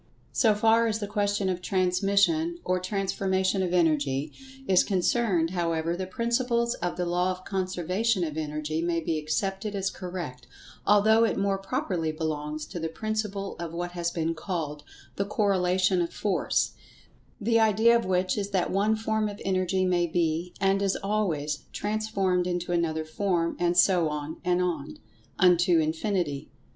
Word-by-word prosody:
So 220 Hz, -4 st, +3 dB
far 225 Hz, +2 st, +4 dB
as 215 Hz, -1 st, 0 dB
the 215 Hz, -, -4 dB
question 205 Hz, -1 st, 0 dB
of 180 Hz, -1 st, -1 dB
transmission, 200 Hz, -, +2 dB
or 185 Hz, 0 st, +1 dB
transformation 190 Hz, 0 st, 0 dB
of 180 Hz, -2 st, -1 dB
Energy, 150 Hz, -4 st, +1 dB, 0.4 s
is 185 Hz, -1 st, +5 dB
concerned, 185 Hz, -3 st, +1 dB
however, 165 Hz, -2 st, -1 dB
the 185 Hz, +1 st, -4 dB
principles 235 Hz, +3 st, 0 dB
of 175 Hz, 0 st, -2 dB
the 180 Hz, -, -1 dB
Law 175 Hz, +1 st, +1 dB
of 185 Hz, 0 st, -5 dB
Conservation 185 Hz, +2 st, 0 dB
of 155 Hz, -3 st, -3 dB
Energy 155 Hz, 0 st, -3 dB
may 170 Hz, 0 st, 0 dB
be 160 Hz, -1 st, -1 dB
accepted 195 Hz, +6 st, -2 dB
as 195 Hz, -1 st, -1 dB
correct, 170 Hz, -10 st, -7 dB, 0.4 s
although 215 Hz, +2 st, +5 dB
it 230 Hz, -, +1 dB
more 195 Hz, 0 st, 0 dB
properly 175 Hz, -4 st, -2 dB
belongs 155 Hz, -1 st, -3 dB
to 175 Hz, -, -7 dB
the 165 Hz, 0 st, -2 dB
principle 210 Hz, +1 st, -3 dB
of 170 Hz, -1 st, -5 dB
what 175 Hz, +1 st, -3 dB
has 175 Hz, -1 st, -2 dB
been 165 Hz, -1 st, -1 dB
called 160 Hz, -4 st, -4 dB, 0.4 s
"The 200 Hz, -, 0 dB
Corelation 185 Hz, -3 st, +2 dB
of 170 Hz, -, -2 dB
Force," 200 Hz, -3 st, 0 dB, 0.7 s
the 230 Hz, +1 st, +2 dB
idea 220 Hz, +2 st, +4 dB
of 235 Hz, -, +2 dB
which 185 Hz, +2 st, 0 dB
is 200 Hz, 0 st, -3 dB
that 190 Hz, -3 st, 0 dB
one 205 Hz, +3 st, +2 dB
form 220 Hz, -1 st, -1 dB
of 205 Hz, -, -8 dB
Energy 185 Hz, 0 st, +1 dB
may 175 Hz, -1 st, +2 dB
be, 170 Hz, +1 st, -1 dB
and 195 Hz, +1 st, +2 dB
is 195 Hz, -1 st, +1 dB
always, 165 Hz, -8 st, -1 dB
transformed 205 Hz, -4 st, 0 dB
into 175 Hz, -1 st, -2 dB
another 160 Hz, -2 st, 0 dB
form, 170 Hz, 0 st, -1 dB
and 175 Hz, 0 st, +1 dB
so 180 Hz, -3 st, +4 dB
on, 150 Hz, +1 st, -5 dB
and 180 Hz, 0 st, +2 dB
on, 160 Hz, -5 st, -3 dB, 0.4 s
unto 180 Hz, -1 st, +4 dB
infinity. 160 Hz, -2 st, -1 dB
185 Hz, 160 wpm, -27 LUFS, 170-200 Hz, 0.7 s, is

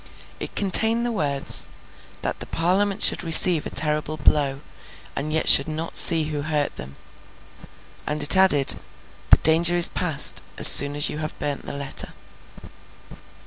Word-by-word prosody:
It -, -, -8 dB
contained 220 Hz, +4 st, +1 dB
the 240 Hz, -, -5 dB
words 145 Hz, -9 st, -2 dB, 0.5 s
'that -, -, -6 dB
the -, -, -10 dB
Parliament 195 Hz, +5 st, -3 dB
should -, -, +1 dB
receive 165 Hz, -1 st, +5 dB
a -, -, -9 dB
terrible 150 Hz, 0 st, -4 dB
blow, 140 Hz, -1 st, -2 dB, 0.5 s
and 155 Hz, +2 st, -7 dB
yet 160 Hz, -, -4 dB
should 140 Hz, -, +7 dB
not 160 Hz, +1 st, -8 dB
see 165 Hz, -1 st, +5 dB
who 150 Hz, -1 st, -7 dB
hurt 150 Hz, -1 st, -5 dB
them.' 70 Hz, 0 st, -12 dB, 1.1 s
And 150 Hz, 0 st, -5 dB
it 145 Hz, -, +5 dB
added, 185 Hz, -8 st, +2 dB, 0.5 s
'the -, -, +5 dB
danger 170 Hz, +2 st, +2 dB
is 175 Hz, -, +7 dB
past, 165 Hz, -6 st, -3 dB, 0.2 s
as -, -, +6 dB
soon 140 Hz, 0 st, +5 dB
as 145 Hz, -, +1 dB
you 150 Hz, -, -9 dB
have 155 Hz, -1 st, -9 dB
burnt 145 Hz, -2 st, -7 dB
the -, -, -8 dB
letter. 140 Hz, -1 st, -6 dB
155 Hz, 155 wpm, -20 LUFS, 145-175 Hz, 1.1 s, should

